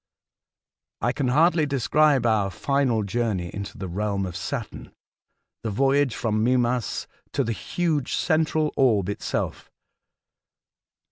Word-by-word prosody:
I 120 - +2
can 135 0 -1
hardly 155 +4 +3
describe 140 0 +3
our 110 -4 +2
final 130 0 0
journey 100 -4 -1
into 100 0 -6
the 95 - -5
realm 100 +2 -1
of 90 -2 -6
Saturn 110 +6 -5 0.4
— - - -54
the 115 - -2
voyage 135 +3 +2
from 110 -2 0
Mimas 125 -1 +1 0.3
to - - +1
the 115 - -2
huge 155 +3 -1
central 155 -2 +1
orb 105 -8 +3
itself. 100 - -3
120 Hz, 125 wpm, -25 LUFS, 105-140 Hz, 0.4 s, hardly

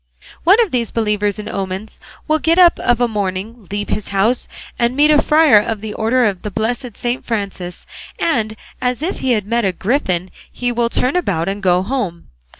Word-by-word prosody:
One 385 +7 +6
of 435 -7 0
these 235 -3 0
believers 210 -2 0
in 210 - -6
omens 195 +2 -5 0.3
will 310 0 +2
get 325 +3 +2
up 355 -2 +6
of 245 -1 +2
a 245 - +3
morning, 205 +1 -4
leave 205 +1 -3
his 210 0 -2
house, 210 +5 +1 0.3
and 235 +1 +1
meet 295 +2 +5
a 300 -1 +5
friar 305 -7 +5
of 215 +1 -2
the 215 -1 -5
order 240 +3 +2
of 195 -4 -1
the 210 - -4
blessed 230 +3 -3
Saint 245 +1 -2
Francis, 195 -5 -4 0.3
and, 220 -9 0 0.3
as 250 +3 -1
if 365 - -2
he 260 -2 +1
had 210 -4 0
met 235 +2 0
a 195 - +2
griffin, 185 - -1 0.2
he 245 0 -2
will 235 -1 0
turn 255 +4 +1
about 190 - 0
and 200 +1 -3
go 180 -1 +3
home. 200 -7 -3
225 Hz, 200 wpm, -18 LUFS, 200-250 Hz, 0.3 s, One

